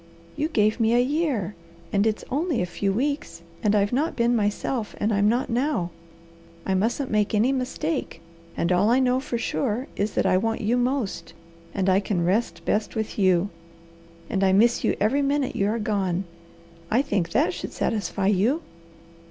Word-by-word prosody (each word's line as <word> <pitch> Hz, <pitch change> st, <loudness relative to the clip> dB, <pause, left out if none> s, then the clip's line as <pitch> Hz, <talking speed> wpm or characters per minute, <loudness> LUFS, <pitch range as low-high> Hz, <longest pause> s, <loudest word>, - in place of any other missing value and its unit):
"You 300 Hz, -, 0 dB
gave 215 Hz, -7 st, +1 dB
me 225 Hz, +1 st, +3 dB
a -, -, +5 dB
year; 260 Hz, -, 0 dB, 0.4 s
and 200 Hz, +2 st, +3 dB
it's 215 Hz, -, -2 dB
only 305 Hz, +1 st, 0 dB
a 180 Hz, -, +1 dB
few 195 Hz, +3 st, -1 dB
weeks, 265 Hz, -, -2 dB, 0.2 s
and 210 Hz, -1 st, +2 dB
I've 205 Hz, +2 st, +2 dB
not 300 Hz, +6 st, 0 dB
been 235 Hz, 0 st, +2 dB
myself, 210 Hz, +2 st, -1 dB
and 215 Hz, +1 st, +1 dB
I'm 205 Hz, +1 st, +3 dB
not 245 Hz, +4 st, +1 dB
now. 240 Hz, -, 0 dB, 0.7 s
I 190 Hz, -, 0 dB
mustn't 235 Hz, +8 st, 0 dB
make 210 Hz, 0 st, +1 dB
any 225 Hz, +5 st, +3 dB
mistake, 275 Hz, +3 st, -2 dB, 0.4 s
and 170 Hz, -, 0 dB
all 185 Hz, +4 st, +3 dB
I 245 Hz, +3 st, +4 dB
know 255 Hz, 0 st, +2 dB
for 250 Hz, -2 st, -3 dB
sure 240 Hz, +1 st, -1 dB
is 205 Hz, +1 st, -1 dB
that -, -, +1 dB
I 185 Hz, -, +4 dB
want 225 Hz, +3 st, -1 dB
you 220 Hz, +3 st, +1 dB
most, 250 Hz, -3 st, -1 dB, 0.4 s
and 195 Hz, -2 st, -1 dB
I 190 Hz, 0 st, +4 dB
can 190 Hz, -4 st, -1 dB
rest 180 Hz, -3 st, 0 dB
best 210 Hz, 0 st, 0 dB
with 220 Hz, -1 st, -3 dB
you, 185 Hz, 0 st, +3 dB, 0.8 s
and 195 Hz, -4 st, -1 dB
I 190 Hz, -1 st, +4 dB
miss 230 Hz, +5 st, +4 dB
you -, -, +2 dB
every 230 Hz, +8 st, +2 dB
minute 280 Hz, -1 st, 0 dB
you 200 Hz, -, +1 dB
are 220 Hz, +2 st, 0 dB
gone. 195 Hz, -4 st, -1 dB, 0.7 s
I 245 Hz, +5 st, +3 dB
think 195 Hz, -10 st, -1 dB
that 180 Hz, +1 st, +2 dB
should 175 Hz, -, -6 dB
satisfy 205 Hz, -2 st, -1 dB
you." 215 Hz, -, +2 dB
220 Hz, 185 wpm, -25 LUFS, 200-255 Hz, 0.8 s, a